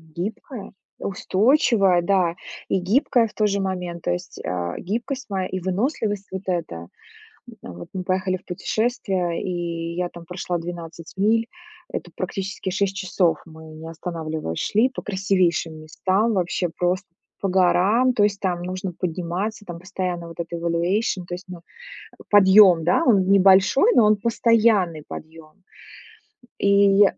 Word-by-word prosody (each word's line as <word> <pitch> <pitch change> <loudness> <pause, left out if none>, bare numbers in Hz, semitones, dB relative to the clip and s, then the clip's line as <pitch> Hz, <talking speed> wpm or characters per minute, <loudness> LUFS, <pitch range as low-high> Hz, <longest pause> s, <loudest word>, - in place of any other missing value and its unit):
гибкая, 210 +4 -6 0.3
устойчивая, 200 - +2
да, 175 -2 +1 0.3
и 190 - +2
гибкая 230 +5 +2
в 210 - -16
тот 215 -1 +2
же 200 0 0
момент. 180 -3 -3
То - - 0
есть, 90 - -5
а, 90 -1 -3
гибкость 245 +7 -4
моя 190 -2 -2
и 185 - -4
выносливость 205 - -2
вот 190 0 -5
эта. 170 - -2
М, 85 +1 -9 0.8
вот 85 0 -10
мы 185 -1 -4
поехали 185 0 0
в - - -15
путешествие, 190 -3 -1
и 170 -2 -3
я 180 0 -1
там 170 -1 -11
прошла 180 0 -3
12 165 -1 -8
миль. 225 +4 +2 0.4
Это - - -5
практически 195 -2 -4
6 195 +1 -1
часов, 185 -3 +1
мы, 160 -1 -13
не 160 +1 -9
останавливаясь, 160 - -5
шли 225 +5 +2
по 255 - -6
красивейшим 185 -5 0
местам, 190 +8 0
вообще 180 -1 0
просто 180 +2 0 0.3
по 195 - -1
горам. 190 +7 +3
То 205 - +3
есть 205 -1 0
там 180 -2 -1
нужно 185 +1 -4
подниматься, 180 +5 -3
там 175 -3 -7
постоянно 180 -2 -4
вот 165 - -12
эта 170 0 -4
evaluation. 175 +4 0
То 175 - -3
есть, 180 +2 -8
ну, 180 -2 -8 0.7
подъем, 190 -4 +7
да, 180 - +3
он 195 -6 +4
небольшой, 195 - +5
но 230 - +6
он 210 0 +5
постоянный 215 -7 +2
подъем. 160 +3 -11 1.0
И 200 0 +5
185 Hz, 150 wpm, -23 LUFS, 170-205 Hz, 1.0 s, подъем